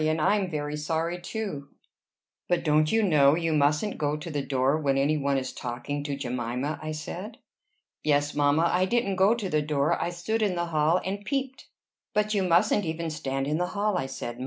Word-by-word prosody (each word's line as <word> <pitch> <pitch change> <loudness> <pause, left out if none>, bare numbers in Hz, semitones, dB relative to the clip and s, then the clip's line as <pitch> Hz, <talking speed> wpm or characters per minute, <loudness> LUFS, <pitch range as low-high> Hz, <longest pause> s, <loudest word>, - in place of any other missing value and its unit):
And 155 +1 +1
I'm 200 +4 +2
very 150 -2 -3
sorry, 165 +3 -2
too." 180 -8 -5 0.8
"But 175 -1 +1
don't 155 0 +3
you 225 0 +3
know 150 -6 +5
you 165 -1 0
mustn't 150 +7 +1
go 150 0 0
to 165 +2 -7
the 145 -1 -1
door 135 +1 +1
when 140 -3 +1
any 140 +3 +2
one 140 -2 0
is 130 -1 -3
talking 125 +4 -4
to 145 -1 -2
Jemima?" 125 +2 -3
I 155 - -4
said. 180 +8 -6 0.7
"Yes, 145 -1 +2
mamma. 145 +3 +3
I 180 +1 +3
didn't 200 -2 0
go 195 +5 +5
to 220 -5 -3
the 155 -4 +1
door: 145 -1 0
I - - 0
stood 175 +6 -2
in 200 -4 +1
the 175 0 -1
hall 160 +1 +2
and 200 +2 -3
peeped." 265 +2 -3 0.5
"But 210 0 +1
you 200 - +2
mustn't 185 +4 +3
even 165 -1 -3
stand 135 -3 -2
in 150 +3 -1
the 180 - 0
hall," 210 0 +1
I 135 - -1
said. 120 -2 -6
155 Hz, 205 wpm, -27 LUFS, 145-185 Hz, 0.8 s, know